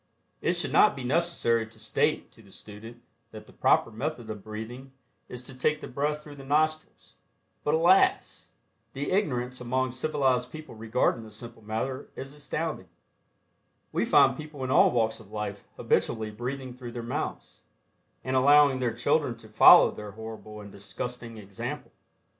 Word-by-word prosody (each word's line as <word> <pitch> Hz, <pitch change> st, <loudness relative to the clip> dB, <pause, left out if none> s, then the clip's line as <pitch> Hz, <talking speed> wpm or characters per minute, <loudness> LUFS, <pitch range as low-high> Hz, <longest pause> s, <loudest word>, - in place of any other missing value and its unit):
It -, -, +1 dB
should -, -, -2 dB
not -, -, +6 dB
be 135 Hz, -, -6 dB
necessary 125 Hz, -6 st, +1 dB
to 110 Hz, 0 st, -17 dB
state 110 Hz, 0 st, 0 dB
to -, -, -19 dB
the -, -, -19 dB
student 115 Hz, +3 st, -12 dB, 0.3 s
that 110 Hz, -1 st, -11 dB
the -, -, -18 dB
proper -, -, +3 dB
method 120 Hz, -1 st, -4 dB
of 105 Hz, -2 st, -8 dB
breathing 115 Hz, +5 st, -8 dB, 0.4 s
is 125 Hz, 0 st, -7 dB
to 130 Hz, -, -8 dB
take 150 Hz, +4 st, +1 dB
the -, -, -8 dB
breath 150 Hz, +3 st, -2 dB
through 145 Hz, -1 st, -12 dB
the 135 Hz, -, -10 dB
nostrils, 155 Hz, +3 st, -1 dB, 0.5 s
but 150 Hz, -, +2 dB
alas! 175 Hz, +4 st, +3 dB, 0.4 s
the 140 Hz, +2 st, -3 dB
ignorance 125 Hz, -10 st, -1 dB
among 130 Hz, +1 st, -1 dB
civilized 130 Hz, -2 st, 0 dB
people 155 Hz, -1 st, -9 dB
regarding 115 Hz, +1 st, 0 dB
this 110 Hz, -1 st, -11 dB
simple 115 Hz, 0 st, -10 dB
matter 115 Hz, +5 st, -4 dB
is 135 Hz, +1 st, -8 dB
astounding. 150 Hz, -, -4 dB, 1.0 s
We -, -, 0 dB
find 135 Hz, -2 st, +5 dB
people 150 Hz, -2 st, -8 dB
in 130 Hz, -, -2 dB
all -, -, +6 dB
walks 110 Hz, -2 st, 0 dB
of 110 Hz, -3 st, -15 dB
life 105 Hz, -2 st, -5 dB
habitually 110 Hz, -1 st, 0 dB
breathing 130 Hz, +3 st, -5 dB
through 120 Hz, -1 st, -9 dB
their 120 Hz, -, -5 dB
mouths, 115 Hz, -, -5 dB, 0.6 s
and 130 Hz, 0 st, -2 dB
allowing 140 Hz, 0 st, +5 dB
their 120 Hz, -3 st, -1 dB
children 140 Hz, 0 st, +1 dB
to 110 Hz, -1 st, -15 dB
follow -, -, +8 dB
their 105 Hz, -1 st, -9 dB
horrible 110 Hz, -1 st, -9 dB
and 100 Hz, -1 st, -11 dB
disgusting 115 Hz, +3 st, -7 dB
example. 100 Hz, -2 st, -7 dB
125 Hz, 165 wpm, -27 LUFS, 110-140 Hz, 1.0 s, follow